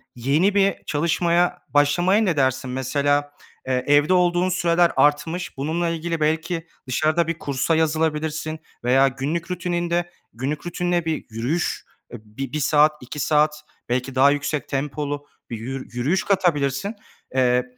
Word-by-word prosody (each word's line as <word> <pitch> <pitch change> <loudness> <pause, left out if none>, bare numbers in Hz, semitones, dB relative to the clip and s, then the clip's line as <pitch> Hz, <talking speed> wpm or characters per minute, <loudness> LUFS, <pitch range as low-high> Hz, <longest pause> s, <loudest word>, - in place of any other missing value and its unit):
yeni 150 - +2
bir 195 -1 +3
çalışmaya 170 +3 +1
başlamaya 175 +8 +3
ne 180 -8 +1
dersin? 130 -1 +1
Mesela, 145 +3 0 0.4
eee, 125 -1 0
evde 145 +4 +4
olduğun 180 0 +3
süreler 175 -1 +2
artmış 150 +4 +1
bununla 160 +5 -1
ilgili 165 0 -3
belki 165 +2 -1 0.2
dışarıda 155 +6 +1
bir 165 0 -3
kursa 140 +4 0
yazılabilirsin 155 0 -1 0.2
veya 130 +3 +4
günlük 150 +7 -3
rutininde, 175 -1 -1 0.2
günlük 135 +7 -4
rutinine 175 -1 -1
bir 160 -1 -2
yürüyüş 120 +10 -2 0.3
bi 110 +5 -7
bir 155 - -1
saat, 150 +1 +4
2 125 +4 -8
saat 150 +1 +2 0.3
belki 125 +2 -1
daha 140 +2 +6
yüksek 145 0 -2
tempolu 145 +1 -3 0.2
bir 115 - -4
yürü 130 +4 -6
yürüyüş 170 +11 +1
katabilirsin, 170 - 0 0.4
eee, 125 -1 +3
150 Hz, 135 wpm, -22 LUFS, 135-170 Hz, 0.4 s, daha